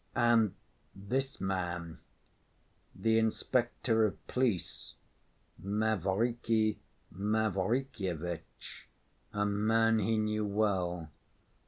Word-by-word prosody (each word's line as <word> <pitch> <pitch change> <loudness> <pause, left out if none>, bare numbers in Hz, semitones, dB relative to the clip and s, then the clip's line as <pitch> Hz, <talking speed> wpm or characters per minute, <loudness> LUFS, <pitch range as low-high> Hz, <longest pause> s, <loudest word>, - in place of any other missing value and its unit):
And 120 -4 +4 0.4
this 130 +8 -2
man—the 90 +4 -4
inspector 115 0 +1
of 100 - -9
police, 120 -10 -1 0.7
Mavriky 110 +2 +1 0.4
Mavrikyevitch, 100 - -2 0.4
a 105 -1 0
man 110 +2 +3
he 110 +2 +1
knew 105 0 0
well. 90 -6 0
105 Hz, 65 wpm, -32 LUFS, 95-115 Hz, 0.7 s, And